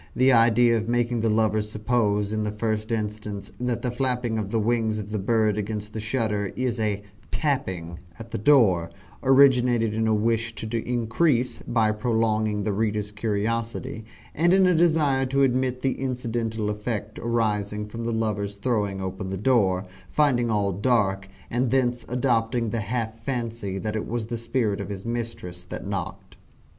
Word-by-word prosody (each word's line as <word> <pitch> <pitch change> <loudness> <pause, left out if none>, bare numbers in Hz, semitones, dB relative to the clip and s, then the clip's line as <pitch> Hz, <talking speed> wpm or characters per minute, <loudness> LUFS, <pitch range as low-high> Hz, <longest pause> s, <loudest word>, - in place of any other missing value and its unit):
The 130 +1 +5
idea 115 0 +5
of 110 +1 -3
making 120 0 +1
the 115 0 +1
lover 110 0 +2
suppose, 105 -1 0
in 110 0 0
the 105 - -1
first 110 +1 -2
instance, 105 -2 -3
that 125 -1 -2
the 125 - 0
flapping 125 -3 -1
of 100 -2 -3
the 115 - 0
wings 110 -1 +1
of 105 -1 -6
the 105 - -1
bird 110 0 +2
against 105 0 -4
the 110 - -4
shutter, 110 -3 -1
is 125 -2 -1
a 105 -2 -1 0.3
"tapping" 95 - -2 0.2
at 115 0 -10
the - - -3
door, 100 - +4 0.3
originated 125 -4 +4
in 110 0 0
a 110 - +3
wish 115 +1 0
to 115 +1 -4
increase, 125 +2 +1
by 110 -3 +2
prolonging, 110 -2 0
the 105 - 0
reader's 105 0 -1
curiosity, 115 +3 -2 0.3
and 175 +4 +3
in 190 -1 +5
a 180 - +4
desire 155 -6 +3
to 135 +1 +2
admit 130 -1 +1
the 135 - -1
incidental 115 -4 -2
effect 105 0 -4
arising 105 -3 -1
from 115 +2 -7
the 115 - -1
lover's 105 -3 -1
throwing 100 -3 -1
open 95 +1 -4
the 95 - -3
door, 100 -4 +2 0.2
finding 125 -6 +2
all 105 -2 +1
dark, 100 -2 +1 0.2
and 125 +1 +1
thence 125 -2 +1
adopting 120 -2 +1
the 115 - -1
half 115 +1 -3
fancy 115 -5 -3
that 105 +2 -3
it 110 - -3
was 115 -1 -2
the 115 +1 -4
spirit 115 -3 -1
of - - -6
his 100 0 -6
mistress 115 -7 -4
that 90 - -7
knocked. 100 -3 -5
110 Hz, 170 wpm, -25 LUFS, 105-120 Hz, 0.3 s, The